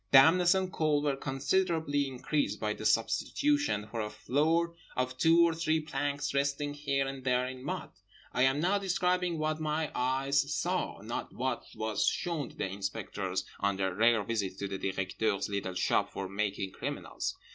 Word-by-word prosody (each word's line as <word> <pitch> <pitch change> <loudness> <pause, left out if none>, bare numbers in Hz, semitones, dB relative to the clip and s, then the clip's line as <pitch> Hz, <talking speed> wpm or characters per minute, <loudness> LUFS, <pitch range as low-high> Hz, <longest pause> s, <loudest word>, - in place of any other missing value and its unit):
Dampness 175 +7 +7
and 185 -1 -1
cold 150 -2 +2
were 145 -2 +1
considerably 145 +1 0
increased 130 -4 -1
by 105 -1 0
the 110 - -1
substitution, 275 - +1
for 115 - -2
a 105 - -3
floor, 160 +9 +1 0.2
of 130 0 -1
two 165 +5 +5
or 165 - 0
three 160 -1 +1
planks 145 -2 -2
resting 140 +1 0
here 140 -2 0
and 135 -1 -6
there 125 -1 +2
in 130 0 -7
mud. - - -4 0.4
I 125 - +1
am 135 +2 +4
now 185 +5 +2
describing 180 -2 +1
what 155 0 -1
my 155 0 -1
eyes 135 +2 +1
saw, - - -1
not - - -5
what - - -2
was 110 -1 0
shown 160 -7 -1
to - - -16
the - - -2
inspectors 95 -1 -3
on 100 -1 +1
their 95 -1 0
rare 110 +2 +4
visits 100 -4 -2
to 100 +1 -4
the 95 0 -4
Directeur's 95 +2 -1
little 100 -2 -3
shop - - +2
for 95 - -4
making 100 0 -2
criminals. - - -4
135 Hz, 170 wpm, -31 LUFS, 105-155 Hz, 0.4 s, Dampness